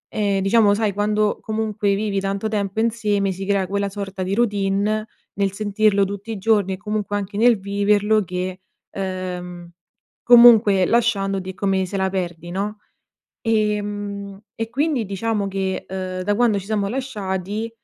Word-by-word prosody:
ehm, 200 -2 +1
diciamo 205 +1 +4
sai 215 -1 0
quando 210 +1 0
comunque 215 -2 -1
vivi 200 -1 -1
tanto 195 +2 -2
tempo 205 0 -1
insieme, 210 -4 0
si 190 +1 -5
crea 200 -1 +1
quella 200 +2 -1
sorta 195 -1 -5
di 190 +2 -1
routine 210 -1 0 0.3
nel 200 -1 0
sentirlo 205 0 +2
tutti 200 +3 -5
i 220 - -4
giorni 205 -1 +2
e - - -5
comunque 210 0 -3
anche 200 0 -4
nel 235 +1 +5
viverlo 205 +2 +2
che, 180 +1 -4 0.3
ehm, 180 -2 -5 0.5
comunque 230 -6 +7
lasciandoti 195 -5 +1
è - - -5
come 190 -1 0
se 195 - -4
la 190 0 0
perdi, 175 -3 -4
no. 205 +3 -3 0.6
Ehm, 205 -2 -2 0.2
e 225 0 -4
quindi 280 0 0
diciamo 200 +1 -2
che, 190 -1 -2
ehm, 185 -1 -4
da 205 +2 +1
quando 230 -2 +3
ci 195 - -5
siamo 205 -1 -1
lasciati, 210 -4 -3
200 Hz, 155 wpm, -21 LUFS, 195-215 Hz, 0.6 s, comunque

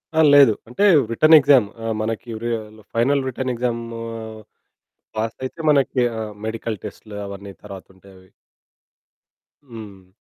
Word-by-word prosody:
ఆ! - - +2
లేదు. 140 -6 +7
అంటే 125 - -2 0.3
రిటర్న్ 155 +7 +6
ఎగ్జామ్‌ 135 -6 +4 0.2
ఆహ్, 110 -1 -1
మనకి 115 +2 -4
వ్రి 115 +2 -4 0.5
ఫైనల్ 135 +3 +2
రిటర్న్ 130 0 -3
ఎక్సాము 115 -1 -3 1.2
పాసయితే 115 +7 -4
మనకి 135 -2 +2 0.2
ఆహ్, 110 -1 -5
మెడికల్ 110 -1 -4
టెస్టులు 105 -2 -9
అవన్నీ 100 0 -9
తరువాత 100 -2 -10
ఉంటాయవి. 95 -1 -19 1.4
హ్మ్. 105 -7 -12
115 Hz, 120 wpm, -21 LUFS, 105-130 Hz, 1.4 s, లేదు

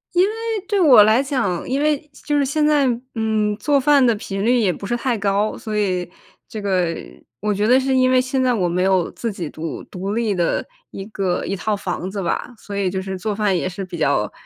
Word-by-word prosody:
因 360 - +5
为 425 - -3 0.3
对 410 -2 +1
我 270 -10 +8
来 220 +4 +4
讲 255 - -2
因 270 +2 0
为 300 -2 +2 0.3
就 295 -1 +1
是 285 - +3
现 300 +3 +1
在， 295 -3 +3 0.3
嗯， 220 -2 0
做 285 +5 +2
饭 285 0 +4
的 235 -2 +3
频 195 -1 -4
率 245 +3 +3
也 205 -5 +2
不 200 - -7
是 240 - 0
太 250 0 0
高， 200 +1 0
所 215 -1 -4
以 185 -4 -1 0.4
这 220 - -7
个 180 -4 0 0.5
我 210 +1 0
觉 205 +2 0
得 255 +3 +5
是 265 0 0
因 255 0 +4
为 255 0 +4
现 260 +1 0
在 255 - +3
我 190 -6 +1
没 180 +1 0
有 190 -2 +2
自 230 - -4
己 175 -5 -5
独 160 0 -6
独 195 +2 -5
立 225 -3 0
的 175 -3 0 0.3
一 195 - -7
个 195 -4 -2
一 195 - -2
套 210 +3 -1
房 185 -2 -4
子 195 -1 -4
吧。 170 - -2
所 205 - -8
以 200 -2 0
就 190 +1 -3
是 190 0 -5
做 210 +1 -2
饭 205 -3 +1
也 180 - -1
是 190 +1 -6
比 175 -1 -7
较， 140 -9 +1
210 Hz, 255 characters per minute, -20 LUFS, 190-255 Hz, 0.5 s, 我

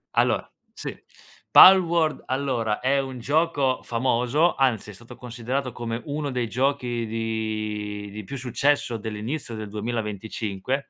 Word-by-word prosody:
Allora, - - +2 0.2
sì. - - -6 0.6
Palworld 170 -4 +7
allora, 130 -5 -1
è 135 +2 +2
un 130 -2 -4
gioco 140 -1 +1
famoso, 125 +7 +1
anzi 125 -5 +1
è - - -12
stato 120 +5 -13
considerato 125 +2 -4
come 115 0 -4
1 145 0 -3
dei 125 -3 -1
giochi 125 -1 -1
di 110 -2 -3
di 105 +1 -7
più 140 +8 -7
successo 130 0 0
dell'inizio 110 +4 -5
del 110 -1 -6
2025, 110 +2 -3
120 Hz, 125 wpm, -25 LUFS, 110-135 Hz, 0.6 s, Palworld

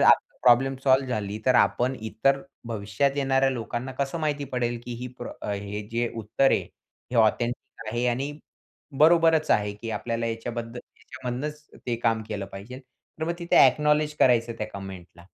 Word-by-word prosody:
आपली - - +4
problem 130 +2 +5
solve 130 0 +4
झाली 105 -3 -2
तर 130 - +5
आपण 125 +2 +3
इतर 110 +5 +1 0.3
भविष्यात 115 +6 -1
येणाऱ्या 135 -1 +2
लोकांना 125 +1 -4
कसं 140 +4 -1
माहिती 150 -2 -1
पडेल? 120 -3 -2
की 120 - -5
ही 125 +2 -6
प्रॉ 120 - -6 0.2
हे 100 +1 -5
जे 120 0 0
उत्तर 115 +5 +2
आहे, - - +3
हे 125 - -11
ऑथेंटिक 115 +1 +1
आहे 120 +1 0
आणि 130 +4 -1 0.7
बरोबरच 165 0 +5
आहे, 105 -1 +2
की 115 +2 -7
आपल्याला 115 +1 -2
याच्याबद्दल 115 +1 -4 0.2
याच्यामधनंच 130 +4 -6 0.2
ते 120 - 0
काम 115 -1 +2
केलं 105 -3 -4
पाहिजे. 105 +7 -8
तर 135 +4 -10
मग 170 - -1
तिथे 170 -1 +1
अ‍ॅक्नॉलेज 150 0 +4
करायचं 120 -2 +4
त्या 105 - -2
कमेंट 95 -3 -7
ला. 85 - -15
120 Hz, 165 wpm, -26 LUFS, 115-135 Hz, 0.7 s, problem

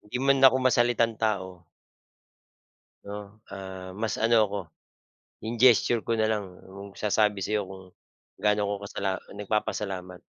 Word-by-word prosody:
Hindi 105 +4 -6
man 135 0 +4
ako 130 -1 +7
masalitang 120 -3 +2
tao. 95 -5 -2 1.4
'No, 105 +1 -9
ah, 95 -1 -8
mas 110 -1 -1
ano 110 -1 +3
ako, 100 0 -4 0.9
'yong 115 +1 -4
gesture 120 -1 +5
ko 115 - +1
na 110 - +1
lang 100 -4 -3 0.2
yung 100 0 -10
magsasabi 105 -1 +1
sa 105 - -3
'yo 95 - -5
kung 95 -1 -10 0.6
gaano 105 0 +2
ako 100 0 -1
kasala 95 -2 -2 0.2
nagpapasalamat. 95 -3 -3
105 Hz, 140 wpm, -27 LUFS, 95-115 Hz, 1.4 s, ako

